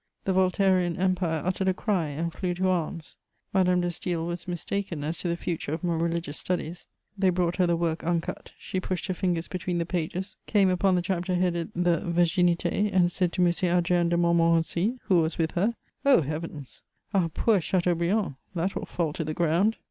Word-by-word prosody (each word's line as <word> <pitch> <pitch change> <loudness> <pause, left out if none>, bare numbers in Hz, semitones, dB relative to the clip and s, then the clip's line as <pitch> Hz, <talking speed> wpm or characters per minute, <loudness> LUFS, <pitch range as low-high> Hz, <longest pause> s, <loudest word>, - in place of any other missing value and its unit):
The 190 - +1
Voltairean 185 -2 +2
empire 180 -4 0
uttered 185 +1 0
a 190 - +2
cry 185 -8 0
and 160 +3 -3
flew 180 -2 -2
to 185 +1 0
arms. 165 -3 -2 0.4
Madame 180 -1 +3
de 175 - 0
Staël 170 -1 -3
was 175 +1 -5
mistaken 175 -2 -3
as 160 +3 -3
to - - -3
the 170 0 -1
future 165 -4 -3
of 160 - -4
my 175 -1 +1
religious 165 -2 -1
studies: 175 -1 -3 0.3
they 195 -2 +2
brought 180 -1 0
her 180 -2 +3
the 170 - +2
work 165 -1 -1
uncut; 170 0 -2
she 185 - -3
pushed 185 -2 -3
her 185 - -1
fingers 175 -2 -1
between 180 -1 -3
the 170 - 0
pages, 180 +4 -3
came 200 -3 +4
upon 185 +1 +2
the 175 - +1
chapter 180 0 -1
headed 175 -2 0
the 175 -2 +2
Virginité, 175 +3 +2
and 180 -2 +3
said 180 -1 0
to 180 - +3
M. 175 - +3 0.2
Adrien 175 0 +2
de 170 - +2
Montmorency, 170 +5 +2
who 180 -3 +3
was 160 +1 -1
with 160 -1 0
her: 210 +7 0 0.3
"Oh 275 - +5
Heavens! 150 -1 -6 0.3
Our 180 -4 +2
poor 205 +4 +2
Chateaubriand! 175 -1 0 0.2
That 180 +3 0
will - - -5
fall 165 -4 -1
to 160 - -3
the 155 0 -4
ground!" 175 +6 +2
175 Hz, 195 wpm, -27 LUFS, 170-185 Hz, 0.4 s, Oh